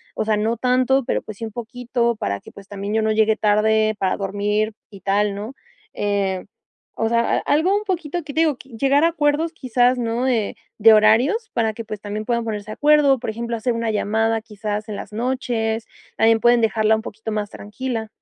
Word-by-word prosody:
o - - -1
sea, 215 -1 +2
no 225 +2 0
tanto, 255 +2 +2
pero - - -1
pues 215 -2 -9
sí, 225 - -5
un 220 - -7
poquito 235 0 -2
para 100 - -3
que, - - -14
pues, 200 -1 -14
también 205 0 -5
yo 220 - +2
no 220 0 +1
llegue 220 0 +3
tarde 215 +1 +2
para 190 -2 0
dormir", 205 +2 -1 0.2
y 200 -2 -12
tal, 200 +2 +1
¿no?, 215 +6 -6 0.4
eh, 200 -2 -1 0.5
o 225 - 0
sea, 235 0 +2
a - - +1
algo 330 +7 +2
un 420 +1 -1
poquito 350 -3 -2
que 290 -2 -8
te 320 - +2
digo, 305 -5 +2
llegar 275 +3 +1
a - - +4
acuerdos, 310 0 +1
quizás, 250 -3 +2
¿no?, 235 +2 -1
eh, 225 -5 0 0.2
de 220 +1 +7
horarios 235 - +4
para 225 -2 0
que, 230 0 -7
pues, 210 -1 -7
también 210 +1 -5
puedan 235 -1 0
ponerse 210 -2 -4
de 215 - -5
acuerdo, 295 -2 +4
por 245 - -4
ejemplo, 235 +1 -4
hacer 235 +2 -1
una 230 0 -2
llamada, 220 +2 0
quizás 210 -1 -5
en 210 - -4
las 205 - -8
noches 230 -2 -2 0.3
también 225 0 +4
pueden 240 0 +5
dejarla 220 0 +3
un 220 - -3
poquito 220 0 -7
más 210 -1 -2
tranquila. 225 +1 -5
225 Hz, 210 wpm, -21 LUFS, 215-250 Hz, 0.5 s, de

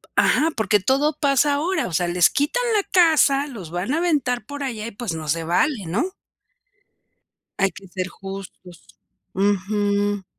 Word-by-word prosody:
Ajá. 315 - +3
Porque 215 -1 +2
todo 275 +9 +1
pasa 285 0 +3
ahora. 345 +6 -1
O 175 - -8
sea, 175 +2 +1
les 175 0 +4
quitan 295 - 0
la 410 - +2
casa, 310 -6 +3
los 200 - -9
van 180 +9 -2
a - - +1
aventar 290 -8 0
por 285 0 -7
allá 230 -5 -4
y 230 - -5
pues, 205 -5 -5
no 155 -1 -6
se 165 +3 0
vale, 190 - 0
¿no? 270 - -1 1.5
Hay 195 -1 +2
que 195 - -13
ser 185 0 -4
justos. 190 -2 -10 0.5
Ujú. 205 +1 0
210 Hz, 160 wpm, -22 LUFS, 185-285 Hz, 1.5 s, les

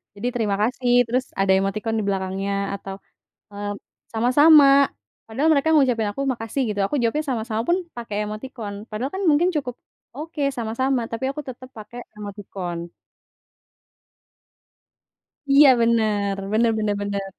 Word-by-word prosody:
jadi, 205 +4 -4
"terima 210 -4 0
kasih," 245 +1 0 0.2
terus 255 +2 0 0.2
ada 195 -1 +3
emoticon 215 +3 -2
di - - -2
belakangnya 195 0 -2 0.2
atau, 195 -1 -7 0.6
eee, 205 0 -5 0.4
"sama-sama," 280 +6 +6 0.6
padahal 265 +8 0
mereka 280 +2 +1
ngucapin 250 -7 +3
aku, 275 - -4
"makasih," 235 +2 -3
gitu, 205 -1 -2
aku 200 - -5
jawabnya, 235 +7 +1
"sama-sama," 225 -2 -2
pun 345 - +3 0.2
pakai 225 -3 -5
emoticon, 215 -1 -7 0.2
padahal 235 +6 -3
kan 390 - -3
mungkin 315 +5 +3
cukup, 270 -5 -2 0.4
"oke 305 +2 -6
sama-sama," 245 +3 -1
tapi 230 +3 -4
aku 300 - -5
tetap 255 0 -9
pakai 220 +2 -10 0.2
emoticon. 190 -4 -7 2.6
Iya 285 +1 +8
bener, 215 -4 +1 0.2
bener 225 +2 +3
bener 210 -1 0
bener. 200 -1 -3
225 Hz, 135 wpm, -22 LUFS, 205-260 Hz, 2.6 s, Iya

